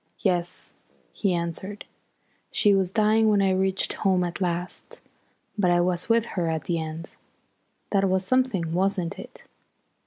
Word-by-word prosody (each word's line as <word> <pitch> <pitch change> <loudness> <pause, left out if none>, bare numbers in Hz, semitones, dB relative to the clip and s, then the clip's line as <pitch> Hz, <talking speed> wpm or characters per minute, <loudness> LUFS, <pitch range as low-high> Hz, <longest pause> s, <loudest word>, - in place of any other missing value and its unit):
"Yes," 175 -3 -1 0.4
he 200 - 0
answered. 175 +4 -4 0.7
"She 205 - +4
was 190 -2 +2
dying 215 +2 +3
when 205 -1 +3
I 195 -1 +3
reached 190 +1 +1
home 190 -3 +1
at 175 +2 -4
last, 175 0 -3 0.6
but 185 -3 +3
I 175 0 +4
was 180 +2 0
with 230 0 +3
her 175 -3 -1
at 160 -1 -2
the 170 -2 -1
end. 160 +1 -6 0.8
That 195 -1 +2
was 190 0 +1
something, 220 -10 +1
wasn't 185 -1 0
it?" - - -11
185 Hz, 150 wpm, -25 LUFS, 175-200 Hz, 0.8 s, She